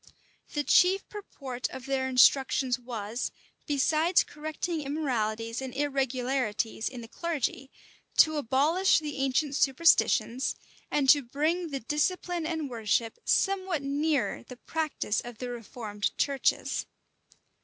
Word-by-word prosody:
The 295 - 0
chief 370 +6 +4
purport 270 - -6
of 260 -1 -8
their 265 -1 -1
instructions 260 -1 +4
was, 235 -1 -4 0.4
besides 310 +5 +3
correcting 310 +2 -4
immoralities 230 -6 -2
and 260 -1 -6
irregularities 260 -5 -1
in 250 -2 -8
the 230 - -9
clergy, 275 -3 -3 0.5
to 310 -1 +6
abolish 295 +8 +3
the 300 -2 -4
ancient 275 +2 0
superstitions, 270 -3 +3 0.3
and 285 -2 +1
to 290 - +7
bring 310 +7 -1
the 275 -2 -4
discipline 335 - -1
and 320 -3 -2
worship 230 - -1
somewhat 375 -6 +1
nearer 285 0 0
the 250 - -12
practice 310 -8 -2
of 240 -2 -9
the 250 +1 -5
reformed 220 -3 -4
churches. 275 -2 0
275 Hz, 120 wpm, -28 LUFS, 245-310 Hz, 0.5 s, to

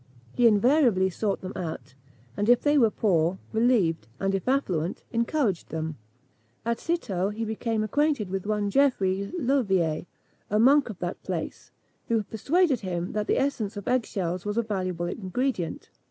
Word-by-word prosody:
He 245 - +5
invariably 220 -3 +4
sought 200 +2 -2
them 185 +1 -6
out; 160 -7 -5 0.4
and 205 +2 0
if 245 - +6
they 290 0 +3
were 240 -6 +5
poor, 180 -4 +1 0.2
relieved, 220 - +2
and 195 0 0
if 195 +3 -2
affluent, 185 - 0
encouraged 235 - 0
them. 160 -1 -3 0.7
At 235 0 0
Citeaux 200 - -1
he 220 +2 -4
became 220 0 -1
acquainted 285 -1 +1
with 195 +1 -3
one 210 -1 0
Geoffrey 200 -7 +2
Leuvier, 195 - +1 0.4
a 210 - +1
monk 265 +4 +5
of 210 - -7
that 175 0 -4
place, - - -5 0.4
who 225 -2 +1
persuaded 275 - +1
him 180 -3 -3
that 210 0 -2
the - - +2
essence 225 -7 -1
of 205 - -7
egg 250 -1 +1
shells 180 -2 -3
was 205 +1 -3
a 235 - +2
valuable 185 -5 -2
ingredient. 190 +1 -3
210 Hz, 160 wpm, -26 LUFS, 185-245 Hz, 0.7 s, if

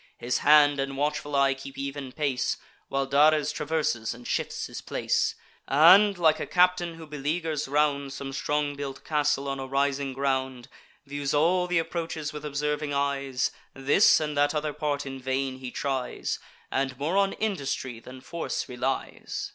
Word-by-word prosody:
His 120 +1 -1
hand 145 -1 +6
and 135 0 -2
watchful 145 0 -1
eye 140 0 +4
keep 135 0 -10
even 140 -1 -5
pace; 140 -3 -1 0.3
While 135 0 -1
Dares 150 +2 +4
traverses 150 -8 -1
and 120 0 -11
shifts - - -2
his - - -7
place, - - 0 0.3
And, 185 +8 +7
like 160 -3 +3
a - - -4
captain 180 -1 +2
who 165 0 -10
beleaguers 150 +1 -2
round 140 -1 +1
Some 135 0 -6
strong 145 +1 -1
built 140 -1 -6
castle 150 -2 0
on 135 0 -3
a 135 - -5
rising 140 0 0
ground, 130 -2 -2 0.4
Views 140 0 -2
all 180 +4 +3
th' 180 -1 +1
approaches 165 -2 -3
with 150 -1 -7
observing 150 0 -2
eyes: 140 -2 0 0.2
This 140 +9 +5
and 150 -1 -3
that 145 +2 +2
other 150 0 -1
part 145 -2 -2
in 135 -1 -7
vain 130 0 -2
he 130 -1 -6
tries, 130 -1 -3 0.3
And 135 -1 -1
more 150 +7 -1
on 195 0 +3
industry 140 - -3
than 130 +2 -11
force 170 +5 -4
relies. 125 +2 -3
145 Hz, 165 wpm, -27 LUFS, 135-150 Hz, 0.4 s, And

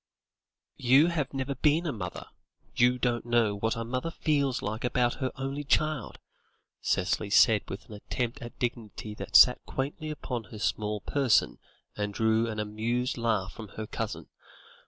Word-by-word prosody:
"You 135 +7 +5
have 155 -6 -2
never 135 0 -2
been 150 +5 +2
a 155 - 0
mother; 90 -7 -6 0.5
you 125 +1 +4
don't 120 -1 0
know 120 -3 +2
what 110 +3 -1
a 115 - -3
mother 130 +7 -2
feels 145 -6 0
like 110 +3 -3
about 125 0 +1
her 130 - 0
only 135 +2 -4
child," 155 -3 0 0.6
Cicely 95 +3 0
said 105 +1 +5
with 95 - -7
an - - -11
attempt 115 +3 -4
at 120 - -9
dignity 110 -3 -4
that 105 +1 -8
sat 125 +2 +8
quaintly 145 +3 -3
upon 125 -6 -4
her 110 - -10
small 105 0 -1
person 135 -5 +2 0.4
and 105 -1 -3
drew 110 +1 +2
an 110 - -4
amused 115 +5 -1
laugh 110 -5 0
from 110 - -9
her 110 - -3
cousin. - - -4
120 Hz, 160 wpm, -29 LUFS, 110-135 Hz, 0.6 s, sat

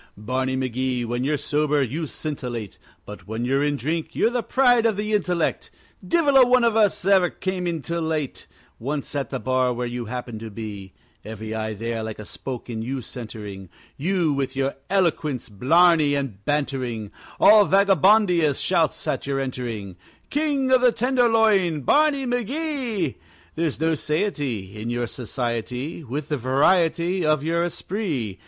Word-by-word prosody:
Barney 130 +5 -2
McGee, 130 -1 -1
when 120 +2 -2
you're 150 +2 +1
sober 150 +1 0
you 150 +6 -3
scintillate, 125 - -5 0.3
But 105 0 -10
when 110 +3 -3
you're 135 +3 +1
in 145 0 +1
drink 160 +5 -3
you're 230 - +2
the 245 -1 0
pride 245 -2 +3
of 220 -3 0
the 210 +1 -2
intellect; 180 -5 0 0.3
Divil 305 -5 +3
a 265 - +9
one 250 0 +4
of 230 -2 +3
us 210 -4 +2
ever 190 -3 +4
came 185 0 -3
in 165 -4 -3
till 170 0 -2
late, 155 -4 -3 0.3
Once 140 +4 -4
at 140 -2 -2
the 135 - -3
bar 130 0 +1
where 120 +1 -3
you 120 0 -4
happened 120 -1 -6
to 110 0 -7
be 100 -3 -8 0.3
Every 110 0 -6
eye 110 -1 -3
there 115 +2 -3
like 110 -1 -5
a 105 - -8
spoke 125 +3 -7
in 115 -2 -4
you 130 +3 -3
centering, 105 -6 -8 0.3
You 170 -1 0
with 135 -1 -2
your 135 0 0 0.2
eloquence, 160 - 0
blarney, 155 - +4
and 125 -8 -4
bantering 130 -7 -2 0.3
All 210 -1 +7
Vagabondia 195 -5 +4
shouts - - 0
at - - -2
your 135 -1 0
entering, 115 -8 -4 0.3
King 285 -3 0
of 255 -1 +5
the 250 -1 +5
Tenderloin, 225 - +2
Barney 285 - +3
McGee! 245 - -2 0.4
There's 160 -3 -2
no 160 +1 +2
satiety 145 - -2
In 115 - -4
your 120 0 -1
society 125 +5 -4
With 140 +3 -5
the 150 - 0
variety 170 +7 +2
Of 155 -2 +2
your 170 +2 +1
esprit. 160 - -3
145 Hz, 160 wpm, -23 LUFS, 120-190 Hz, 0.4 s, a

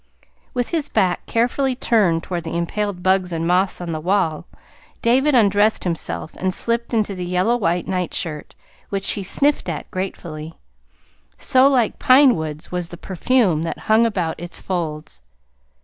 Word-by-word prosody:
With 245 -1 -1
his 320 -4 -2
back 185 -5 0
carefully 250 +3 +1
turned 200 -10 +2
toward 175 -2 -4
the 165 +1 -4
impaled 180 +2 -3
bugs 185 -1 +2
and 165 0 -2
moths 185 +2 +1
on 175 -2 -5
the 155 - -3
wall, 170 -2 0 0.6
David 265 +5 +3
undressed 210 -1 +3
himself 165 -2 -4
and 185 0 -1
slipped 235 0 0
into 215 -4 0
the 180 -1 -5
yellow 180 +6 +1
white 180 -6 -1
nightshirt, 175 -4 -3 0.3
which 195 -1 +1
he 205 - -2
sniffed 275 +5 +1
at 155 - -6
gratefully, 165 -4 -6 0.8
so 260 +1 +4
like 255 -5 +1
pine 260 0 +6
woods 155 -2 -6
was 180 -1 -2
the 170 - -10
perfume 190 -2 +1
that 165 - -3
hung 225 +2 +5
about 180 -7 -2
its 175 +1 -7
folds. 155 - -4
185 Hz, 155 wpm, -20 LUFS, 170-230 Hz, 0.8 s, pine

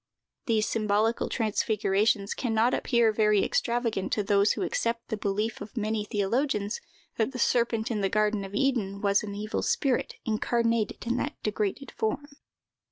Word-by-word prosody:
These 220 -2 +2
symbolical 215 +1 +1
transfigurations 210 -2 +1
can 235 -4 -2
not 230 +3 +3
appear 235 -3 +3
very 210 -1 +3
extravagant 235 -5 0
to 210 - +1
those 200 0 +3
who - - -3
accept 230 0 -2
the 220 - -1
belief 210 +2 -2
of 220 - -9
many 215 -1 -1
theologians, 210 - -1 0.4
that 225 +4 0
the - - -5
serpent 235 -1 +1
of 215 -3 -1
the 195 - +1
garden 210 0 +1
of 195 +1 -7
Eden 215 -6 0
was 200 -1 +3
an 205 -1 -6
evil 215 +1 -3
spirit 265 -3 0
incarnated 230 0 0
in 240 +1 0
that 290 +3 -2
degraded 210 +5 -2
form. 220 +6 -2
220 Hz, 160 wpm, -28 LUFS, 205-235 Hz, 0.4 s, not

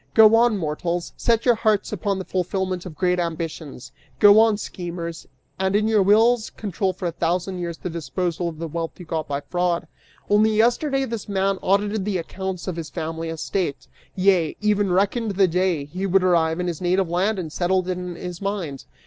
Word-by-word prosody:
Go 220 0 +8
on, 235 -2 +4
mortals; 170 +1 -3
set 230 -1 +1
your 245 - +6
hearts 215 -2 0
upon 200 0 -1
the 190 - -5
fulfillment 185 0 -2
of 160 - -9
great 180 0 +1
ambitions: 160 -5 -5 0.3
Go 205 +1 +7
on, 220 -2 +4
schemers, 170 -4 -6 0.3
and 190 +1 +1
in 215 +1 +2
your 220 -2 +3
wills 220 +4 +4
control 195 -2 -2
for 185 0 -7
a - - -1
thousand 180 +3 -1
years 170 -2 -4
the - - -6
disposal 170 +2 -2
of 160 - -10
the 165 +1 -4
wealth 165 +2 -5
you 180 - -9
got 160 -1 -3
by 140 0 -2
fraud! 175 0 -1 0.4
Only 215 +1 +3
yesterday 270 +5 +2
this 225 -4 -6
man 195 -1 0
audited 205 +1 +1
the 200 -1 -1
accounts 190 +2 -5
of 180 -2 -3
his 160 -3 -5
family 165 +1 -4
estate, 165 -1 -3 0.3
yea, 185 -4 +2
even 205 -2 +1
reckoned 200 +3 +1
the 190 0 +4
day 175 -4 0
he 185 +7 -4
would 190 0 +3
arrive 165 -2 +2
in 180 - -1
his 175 -2 -3
native 185 +1 +1
land 190 +5 0
and 160 -4 -5
settled 185 0 +1
it 185 - -1
in 180 -1 -6
his 180 0 -7
mind! 190 -9 -4
185 Hz, 195 wpm, -23 LUFS, 170-205 Hz, 0.4 s, Go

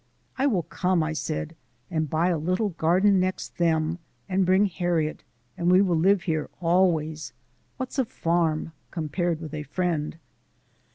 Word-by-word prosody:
"I 270 +2 +2
will 195 -10 +1
come," 180 -1 0
I 160 0 -2
said, 160 +1 -3 0.4
"and 155 -3 -1
buy 165 +4 +2
a 175 - +1
little 185 +7 0
garden 185 +4 +3
next 185 0 -2
them, 165 0 +1 0.3
and 190 -1 +1
bring 190 +2 +5
Harriet, 175 -4 -1 0.3
and 175 - 0
we 185 - +7
will 190 -3 +3
live 190 +3 +3
here 155 -4 -1
always. 165 -3 +1 0.4
What's 260 +1 -4
a 260 - +3
farm 165 -5 0 0.2
compared 165 0 -1
with 160 -2 -8
a 155 - -3
friend?" 165 -1 -2
170 Hz, 155 wpm, -26 LUFS, 160-185 Hz, 0.4 s, we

